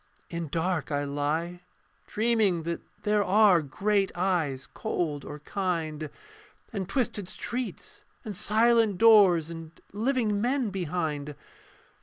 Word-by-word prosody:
In 170 -1 -3
dark 165 +1 -1
I 145 0 0
lie: 150 +5 -2 0.5
dreaming 215 -6 +1
that 170 +1 -3 0.2
there 210 0 +2
Are 195 -3 +5
great 195 +7 0
eyes 165 -8 0
cold 160 -9 -2
or 145 - -7
kind, 160 -4 -3 0.6
And 195 -3 -3
twisted 210 -4 -1
streets 245 +5 -6 0.2
and 210 -2 -5
silent 220 +1 +3
doors, 190 -7 +6
And 165 -1 -9
living 220 -2 0
men 250 -2 0
behind. 155 -5 -3
180 Hz, 115 wpm, -28 LUFS, 160-210 Hz, 0.6 s, doors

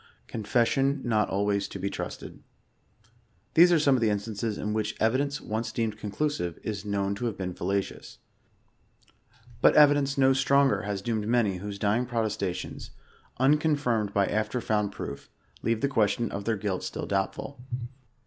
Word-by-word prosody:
Confession 120 - +1
not 110 -4 +1
always 100 0 0
to - - -7
be 100 - -3
trusted. - - -6 1.1
These 175 +2 +7
ate 165 -3 +4
some 140 -2 +4
of 130 - +2
the 110 - +3
instances 105 +1 -2
in 105 0 -2
which 110 0 -2
evidence 140 +6 +1
once 110 +2 -3
deemed 110 -2 -2
conclusive 100 - -2
*is 105 -3 -4
known 100 -1 -1
to 100 +4 -4
have 110 - -4
been 90 -2 -3
fallacious. 95 +2 -3 1.4
But - - +6
evidence 145 -2 +5
no 135 0 +5
stronger 140 0 +3
has 100 -1 -4
doomed 110 -2 -1
many 110 -5 +2
whose 100 +2 -6
dying 110 +4 +1
protesta 110 -5 -1
tions, - - -7 0.5
unconfirmed 135 -6 +2
by 100 -1 +2
after 110 +5 -1
found 105 -3 0
proof, 70 -6 -7 0.3
leave 115 -1 0
the - - +2
question 115 -3 +1
of 100 0 -5
their 115 -2 0
guih 95 -2 -2
still - - -4
doubtful. 100 +7 -2
110 Hz, 160 wpm, -27 LUFS, 100-130 Hz, 1.4 s, These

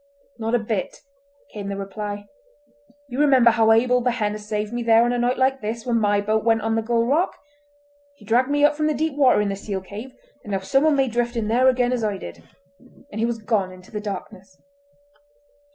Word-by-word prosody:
"Not 225 +1 0
a - - +5
bit," 220 -3 -3 0.6
came 200 -2 -6
the 200 - -4
reply. 205 +1 -6 0.8
"You 260 0 -5
remember 265 -5 +5
how 225 -1 +3
Abel 250 +2 +3
Behenna 220 -4 -1
saved 210 +1 -4
me 240 - -2
there 230 0 +4
on 240 - 0
a 245 - -1
night 245 +1 +1
like 265 0 +1
this 225 +3 -4
when 235 -2 +1
my 205 -1 +2
boat 215 +1 0
went 225 -1 +2
on 225 0 0
the 225 - +1
Gull 230 +1 0
Rock. 305 +9 +1 0.8
He 215 - -18
dragged 245 +5 +2
me 290 0 +3
up 295 - +4
from 305 0 0
the 305 - 0
deep 315 -1 -1
water 265 -6 +4
in 205 - -1
the 195 - -2
seal 200 0 -4
cave, 215 +7 -9 0.3
and 205 - -6
now 195 - +1
someone 275 +10 +2
may 270 -1 +2
drift 240 +1 -1
in 220 -2 -2
there 250 +3 +3
again 250 -1 +2
as 240 -3 -2
I 205 -2 -1
did," 85 - -10 0.7
and 220 - -6
he 230 - +1
was 235 -1 -2
gone 210 -4 -1
into 185 0 -15
the 210 - -4
darkness. 195 -2 -8
225 Hz, 215 wpm, -22 LUFS, 210-250 Hz, 0.8 s, a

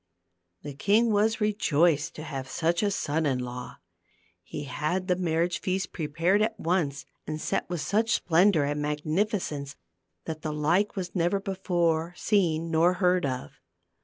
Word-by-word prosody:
The 145 - -6
king 210 - +3
was 220 +3 +2
rejoiced 170 -7 +2
to 155 - -7
have 135 -4 -6
such 170 +1 0
a 205 - +2
son 160 -5 -1
in 135 -2 +1
law. 125 0 -6 0.7
He - - -7
had 155 +7 -2
the 180 - +3
marriage 175 -1 0
feast 185 0 -2
prepared 165 +5 +1
at 220 +1 0
once 160 -5 -1 0.2
and 155 0 -3
set 195 - -2
with 175 -3 -2
such 220 +8 +1
splendor 175 -1 +3
and 145 +1 -1
magnificence 150 0 -2 0.5
that 160 -1 -5
the 155 -1 -3
like 170 +7 +1
was 185 -3 -4
never 175 +2 +1
before 175 -4 0
seen 165 -6 +1
nor 165 +3 +4
heard 180 -3 +2
of. 125 - -4
170 Hz, 155 wpm, -27 LUFS, 150-190 Hz, 0.7 s, nor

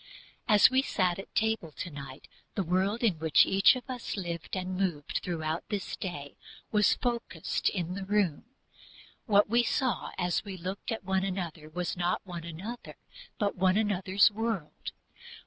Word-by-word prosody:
As 210 -1 +7
we 260 0 +4
sat 185 -8 0
at 195 - -10
table 220 -7 0
to 170 - -6
night 140 -1 -9 0.3
the 195 - 0
world 190 +6 0
in 190 -9 +2
which 160 -1 +5
each 195 +6 +5
of 250 -2 -7
us 250 -4 -4
lived 170 -1 -4
and 185 0 -3
moved 175 -6 -1
throughout 160 -2 -2
this 205 -4 -3
day 145 -7 -6 0.4
was 210 -1 +4
focused 235 -9 -1
in 180 -2 -3
the 195 +1 -4
room. 195 -5 +1 0.8
What 205 -2 +5
we 235 +3 +4
saw 240 -2 0
when 175 - 0
we 195 -3 -7
looked 185 +5 -5
at 225 - -3
one 190 0 +1
another 175 -5 -4
was 175 +2 -3
not 175 +1 -1
one 175 -3 -6
another, 190 +9 -7 0.4
but 205 -2 0
one 185 +1 +3
another's 200 -2 +3
world. 220 -7 -3
190 Hz, 165 wpm, -30 LUFS, 170-210 Hz, 0.8 s, As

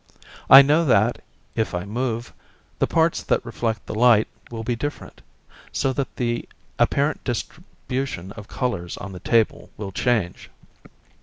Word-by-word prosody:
I 135 +1 +11
know 150 +4 +3
that, 115 -3 +3 0.3
if 110 -5 -1
I 90 +1 -3
move, 120 +2 -3 0.5
the - - +2
parts 165 0 +2
that - - 0
reflect 115 -3 -3
the - - -6
light 110 -1 +5 0.2
will 115 -1 -6
be 120 +1 -1
different, 145 - -6 0.5
so 135 - 0
that 135 0 -3
the 120 -1 -2 0.3
apparent 145 +2 +1
distribution 130 - -5
of 105 -1 -10
colours 100 -9 -3
on 100 - -7
the 90 - -8
table 115 +4 +1
will 100 -2 -5
change. 105 -4 -1
120 Hz, 145 wpm, -23 LUFS, 105-130 Hz, 0.5 s, I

